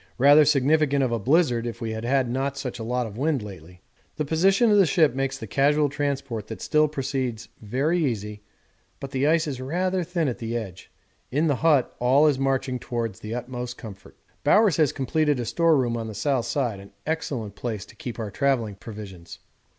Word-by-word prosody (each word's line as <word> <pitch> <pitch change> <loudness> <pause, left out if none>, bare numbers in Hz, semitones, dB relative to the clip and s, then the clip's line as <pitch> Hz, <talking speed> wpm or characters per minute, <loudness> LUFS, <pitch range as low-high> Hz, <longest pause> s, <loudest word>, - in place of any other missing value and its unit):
Rather 145 +4 +7
significant 145 0 +3
of 125 - 0
a 115 - 0
blizzard 125 - +2
if 115 - -6
we 115 -1 -3
had 110 0 -5 0.2
not 130 +3 -1
had - - -15
such 125 -3 -5
a - - -4
lot 125 +2 -1
of 110 +1 -8
wind 145 -4 0
lately. 90 -3 -11 0.3
The 150 - -2
position 195 - +3
of 205 - +5
the 190 - +5
ship 155 -2 +3
makes 135 0 -2
the 120 - -7
casual 145 +6 +2
transport 140 -6 -3
that 110 - -7
still 155 -1 +2
proceeds 130 -5 -3
very 140 +11 0
easy, 105 -5 -3 0.6
but 135 - -7
the 135 +1 +1
ice 160 +1 +3
is 135 -4 -4
rather 180 +6 -1
thin 170 -2 -1
at 125 - -3
the 115 +1 -3
edge. 95 -6 -8 0.4
In 150 +5 +1
the 145 -5 +1
hut 150 -6 +2
all 130 +5 +4
is 145 -3 +3
marching 135 -1 0
towards 115 -6 -4
the 110 +2 -5
utmost 125 0 -5
comfort. 100 -5 -11 0.3
Bowers 210 -5 +4
has 155 -4 +3
completed 145 +1 0
a 120 - -2
storeroom 140 -5 +2
on 115 -1 -4
the 110 - -7
south 130 +2 0
side, 120 -8 -1
an 100 0 -14
excellent 140 -9 -3
place 110 -2 -5
to - - -17
keep 120 - -7
our 110 -3 -4
travelling 120 -7 0
provisions. 100 -5 -10
130 Hz, 200 wpm, -25 LUFS, 115-150 Hz, 0.6 s, Rather